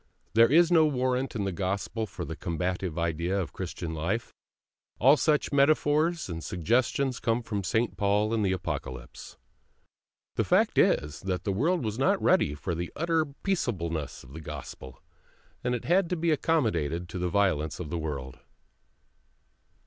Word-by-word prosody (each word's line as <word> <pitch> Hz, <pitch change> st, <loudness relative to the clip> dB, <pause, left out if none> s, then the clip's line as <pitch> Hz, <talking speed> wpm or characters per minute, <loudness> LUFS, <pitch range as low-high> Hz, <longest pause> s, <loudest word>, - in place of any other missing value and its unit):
There 115 Hz, +2 st, +6 dB
is 170 Hz, +3 st, +5 dB
no 160 Hz, -2 st, +6 dB
warrant 130 Hz, -2 st, -1 dB
in 105 Hz, -, -1 dB
the 100 Hz, -, -1 dB
Gospel 100 Hz, +5 st, -2 dB
for -, -, -6 dB
the 80 Hz, +3 st, -5 dB
combative 90 Hz, 0 st, -3 dB
idea 85 Hz, +3 st, 0 dB
of 95 Hz, -, -2 dB
the -, -, -32 dB
Christian 80 Hz, -1 st, -5 dB
life; 95 Hz, +9 st, -2 dB, 0.6 s
all 135 Hz, +6 st, +6 dB
such 150 Hz, -1 st, +1 dB
metaphors 155 Hz, +3 st, +3 dB
and 80 Hz, -3 st, -5 dB
suggestions 120 Hz, -, 0 dB
come 115 Hz, +1 st, 0 dB
from 105 Hz, -3 st, -3 dB
St. 115 Hz, +3 st, 0 dB
Paul 105 Hz, +2 st, +2 dB
and 110 Hz, -2 st, +1 dB
the 95 Hz, -, +2 dB
Apocalypse. 65 Hz, -9 st, -5 dB, 1.0 s
The -, -, +3 dB
fact -, -, +3 dB
is 75 Hz, 0 st, +2 dB
that 95 Hz, -1 st, -2 dB
the 100 Hz, -, -1 dB
world 155 Hz, -, +1 dB
was 110 Hz, +2 st, -3 dB
not 195 Hz, +8 st, +3 dB
ready 175 Hz, -, +3 dB
for 85 Hz, +4 st, -3 dB
the 85 Hz, +1 st, -4 dB
utter 165 Hz, 0 st, +1 dB, 0.2 s
peaceableness 85 Hz, -, -2 dB
of 65 Hz, +1 st, -14 dB
the 80 Hz, -, -7 dB
Gospel, 65 Hz, -4 st, -9 dB, 0.6 s
and 125 Hz, 0 st, 0 dB
it 120 Hz, -, -6 dB
had 175 Hz, +1 st, +3 dB
to 180 Hz, -, 0 dB
be 170 Hz, 0 st, +1 dB
accommodated 90 Hz, -, 0 dB
to 90 Hz, -, -5 dB
the 90 Hz, 0 st, 0 dB
violence 80 Hz, -7 st, +1 dB
of 80 Hz, -4 st, -6 dB
the 85 Hz, -, -2 dB
world. 70 Hz, -5 st, -5 dB
100 Hz, 165 wpm, -28 LUFS, 85-140 Hz, 1.0 s, There